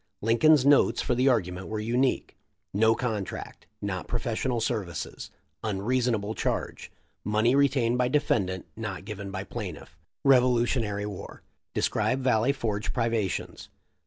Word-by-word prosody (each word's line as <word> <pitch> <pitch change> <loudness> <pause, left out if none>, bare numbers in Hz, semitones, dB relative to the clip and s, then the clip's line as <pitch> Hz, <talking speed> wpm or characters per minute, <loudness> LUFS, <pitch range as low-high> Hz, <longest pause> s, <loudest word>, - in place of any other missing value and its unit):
Lincoln's 130 +6 +4
notes 140 0 +5
for - - 0
the 125 +2 +2
argument 95 -6 0
were 110 0 -3
unique: 120 +4 0 0.4
"No 110 +3 +4
contract. 110 -6 -4
— - - -51
Not 95 -1 -4
profes 120 0 -2
sional 125 -3 0
services. 110 -6 -3 0.2
— - - -47
Unreasonable 110 +1 0
charge. - - -3 0.2
— - - -43
Money 110 +4 +2
re 140 0 +5
tained 120 -3 +1
by 125 - +3
Deft 100 -9 0
not 105 -5 -5
given 100 -1 -6
by 95 0 -4
Pl'fT. 100 -5 -7 0.2
— - - -64
Revolutionary 120 -5 +3
War. 100 -3 -8
— - - -56
Describe 130 - +1
Valley 125 0 +3
Forge 110 -6 -2
privations. 115 -5 -2
115 Hz, 150 wpm, -27 LUFS, 105-125 Hz, 0.4 s, notes